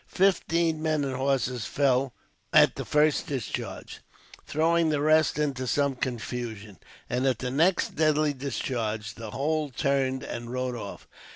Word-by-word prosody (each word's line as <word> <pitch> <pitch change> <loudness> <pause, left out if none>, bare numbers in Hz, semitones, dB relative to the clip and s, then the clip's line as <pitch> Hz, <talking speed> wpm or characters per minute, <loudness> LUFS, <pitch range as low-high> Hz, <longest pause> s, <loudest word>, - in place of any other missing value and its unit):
Fifteen 170 -4 +1
men 155 -2 +1
and 135 -2 -2
horses 130 -3 0
fell 135 -2 +1 0.4
at - - +6
the - - -5
first 150 0 +2
discharge, 130 -6 -5 0.5
throwing 165 +2 +2
the 150 -2 +1
rest 155 -1 +3
into 135 -4 -1
some 140 +1 +1
confusion; 115 -5 -5 0.3
and 125 +2 0
at 130 -3 +2
the 125 +2 -3
next 170 +7 +2
deadly 155 -1 +3
discharge, 115 -5 -3
the 115 -2 -8
whole 150 +6 -1
turned 130 0 0
and 120 0 -6
rode 125 0 -2
off. 100 -4 -8
135 Hz, 145 wpm, -27 LUFS, 125-155 Hz, 0.5 s, at